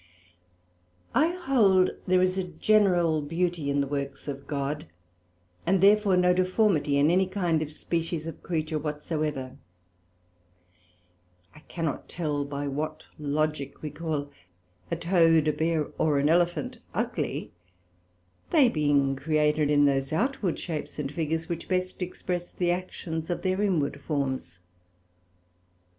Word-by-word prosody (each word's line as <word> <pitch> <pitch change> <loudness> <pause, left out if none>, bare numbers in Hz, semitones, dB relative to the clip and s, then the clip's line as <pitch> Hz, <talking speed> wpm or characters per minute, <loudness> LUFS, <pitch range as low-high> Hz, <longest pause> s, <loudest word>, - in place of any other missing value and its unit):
I 300 +7 +4
hold 250 - +3 0.2
there 185 0 +4
is 185 0 +1
a 190 - 0
general 175 -3 +2
beauty 165 0 -1
in 140 0 +2
the - - 0
works 140 0 -4
of 140 -1 -6
God, 145 +2 -3 0.8
and 190 +2 +2
therefore 200 0 +5
no 180 0 +4
deformity 185 -5 +2
in 145 +3 +4
any 185 +1 +3
kind 175 -5 0
or 155 - -3
species 165 +1 -3
of 165 - -7
creature 155 -2 -2
whatsoever: 150 -3 -3 2.0
I 155 - -14
cannot 165 -4 -3
tell 150 -4 -2
by 140 0 -4
what 155 +3 -3 0.2
Logick 150 -1 -2
we 150 - -4
call 150 -3 -3 0.6
a - - 0
Toad, 165 -3 +3
a 155 - +3
Bear, 160 -1 0
or 150 -2 +3
an 140 +2 +2
Elephant 175 +1 +1 0.2
ugly, - - -2 1.0
they 285 -7 +5
being 145 -5 +2
created 150 0 +1
in 145 -1 +5
those 135 0 +1
outward 205 - 0
shapes 160 -4 -5
and 140 -2 -3
figures 160 +1 -2
which 170 -2 -4
best 185 0 -1
express 180 -1 -4
the 175 -1 0
actions 170 -2 -4
of 175 - -2
their 185 +1 +1
inward 150 -8 0
forms. 135 - -3
160 Hz, 135 wpm, -27 LUFS, 145-180 Hz, 2.0 s, therefore